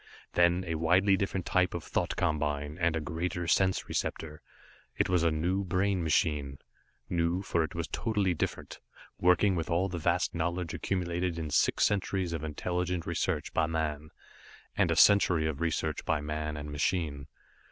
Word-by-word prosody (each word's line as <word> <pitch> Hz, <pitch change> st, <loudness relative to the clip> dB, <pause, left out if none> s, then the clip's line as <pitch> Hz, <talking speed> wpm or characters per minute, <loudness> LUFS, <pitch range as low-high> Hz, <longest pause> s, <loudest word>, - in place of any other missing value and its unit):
Then 85 Hz, +1 st, +3 dB
a 80 Hz, -, -2 dB
widely 90 Hz, +5 st, +3 dB
different 95 Hz, -2 st, -2 dB
type 90 Hz, -1 st, +1 dB
of 85 Hz, -, -4 dB
thought -, -, -2 dB
combine, 75 Hz, -3 st, -1 dB
and 85 Hz, -1 st, +2 dB
a -, -, 0 dB
greater 85 Hz, +2 st, -3 dB
sense 95 Hz, +2 st, +2 dB
receptor. 75 Hz, -1 st, -3 dB, 0.6 s
It -, -, +1 dB
was 90 Hz, -2 st, +3 dB
a 85 Hz, -, +3 dB
new 90 Hz, +5 st, 0 dB
brain 95 Hz, +1 st, 0 dB
machine. 75 Hz, -4 st, 0 dB, 0.5 s
New, 85 Hz, +2 st, 0 dB
for 85 Hz, -3 st, +1 dB
it 80 Hz, -, -6 dB
was 85 Hz, -1 st, -3 dB
totally 105 Hz, -5 st, 0 dB
different, 80 Hz, -, -4 dB, 0.4 s
working 90 Hz, +3 st, +4 dB
with 80 Hz, -2 st, -3 dB
all 90 Hz, +4 st, +1 dB
the 85 Hz, -1 st, -4 dB
vast 85 Hz, +3 st, +1 dB
knowledge 85 Hz, 0 st, -2 dB
accumulated 90 Hz, -2 st, -2 dB
in 80 Hz, -2 st, -4 dB
six -, -, +2 dB
centuries 95 Hz, -3 st, -1 dB
of 80 Hz, -2 st, -4 dB
intelligent 90 Hz, +3 st, -2 dB
research -, -, -2 dB
by 80 Hz, -1 st, +2 dB
man, 75 Hz, -2 st, -2 dB, 0.7 s
and -, -, +2 dB
a -, -, +2 dB
century 90 Hz, -6 st, +5 dB
of 80 Hz, 0 st, -3 dB
research 85 Hz, -2 st, -1 dB
by 80 Hz, -, 0 dB
man 75 Hz, +1 st, -4 dB
and 75 Hz, 0 st, -6 dB
machine. 75 Hz, -2 st, -1 dB
85 Hz, 165 wpm, -30 LUFS, 80-90 Hz, 0.7 s, century